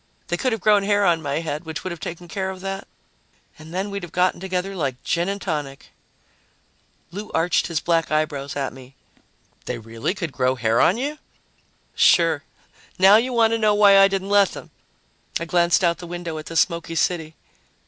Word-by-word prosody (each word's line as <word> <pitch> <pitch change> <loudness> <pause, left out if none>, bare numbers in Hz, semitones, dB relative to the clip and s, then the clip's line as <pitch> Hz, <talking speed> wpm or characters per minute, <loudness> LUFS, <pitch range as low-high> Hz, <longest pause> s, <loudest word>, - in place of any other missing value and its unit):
They 175 - +1
could 255 +7 0
have 225 -3 -2
grown 210 +1 +4
hair 205 0 +2
on 170 -3 +2
my 145 +1 -2
head, 155 -1 -4
which 160 -1 -6
would 185 - -4
have 170 - -7
taken 175 +2 -7
care 190 +1 -3
of 190 -1 -7
that, 195 0 -5 0.7
and 155 +1 -12
then 190 +3 -3
we'd 200 0 -4
have 175 -2 -9
gotten 180 0 +1
together 190 +1 -3
like 135 -7 -3
gin 170 +2 0
and 200 0 -3
tonic." 145 -7 -5 1.2
Lou 205 +4 -7
arched 165 +2 +2
his 165 -3 -1
black 165 0 0
eyebrows 150 -2 -2
at 140 -2 -3
me. 130 0 -14 0.7
"They 125 - -3
really 115 - -4
could 170 -5 -4
grow 130 0 0
hair 115 -2 +1
on 190 - +4
you?" 290 +4 -3 0.7
"Sure. - - +4 0.6
Now 195 +3 +7
you 250 +3 0
want 230 -2 +3
to 230 - 0
know 210 -1 +3
why 200 -1 +7
I 195 - +8
didn't 195 0 -3
let 200 -2 +4
them." - - -10 0.7
I 170 - -4
glanced 175 +1 +2
out 170 -1 +2
the 175 - -8
window 170 -2 -5
at 155 - -10
the 165 - -7
smoky 165 -1 0
city. 160 -2 -1
175 Hz, 200 wpm, -22 LUFS, 155-195 Hz, 1.2 s, I